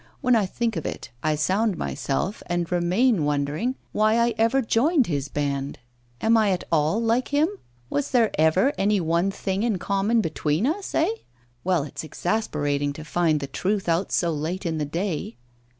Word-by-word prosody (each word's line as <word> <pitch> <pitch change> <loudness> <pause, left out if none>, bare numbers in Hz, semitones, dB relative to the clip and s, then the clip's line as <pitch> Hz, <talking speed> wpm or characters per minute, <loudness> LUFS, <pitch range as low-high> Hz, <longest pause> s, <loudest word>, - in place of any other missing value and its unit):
When 250 -1 +4
I 210 -4 +2
think 230 +3 -2
of 160 - -4
it, - - -6
I 155 -1 +1
sound 190 +6 +1
myself, 170 +9 -2
and 175 -1 -2
remain 180 +3 +2
wondering 145 - -1 0.2
why 215 +1 +3
I 235 0 +2
ever 230 +4 +2
joined 265 +6 +3
his 145 -6 -2
band. 140 -1 -2 0.4
Am 225 +1 +4
I 215 -2 +3
at 185 -2 0
all 160 +5 +2
like 230 +2 +1
him? 290 +2 +2 0.4
Was 285 - -1
there 235 -4 +3
ever 160 - +3
any 205 +1 +3
one 170 +2 +1
thing 195 0 -2
in 225 -4 +1
common 200 +5 +1
between 160 0 0
us, 365 +8 -2
eh? 320 - +3 0.6
Ah! 180 -5 +2
it's 145 - -7
exasperating 145 -5 -1
to 150 +1 -9
find 155 -1 +1
the - - -2
truth 190 +8 -2
out 170 +3 +1
so 170 -2 +1
late 165 +6 -3
in 160 -2 -1
the 150 - 0
day! 165 - -3
185 Hz, 180 wpm, -24 LUFS, 155-225 Hz, 0.6 s, When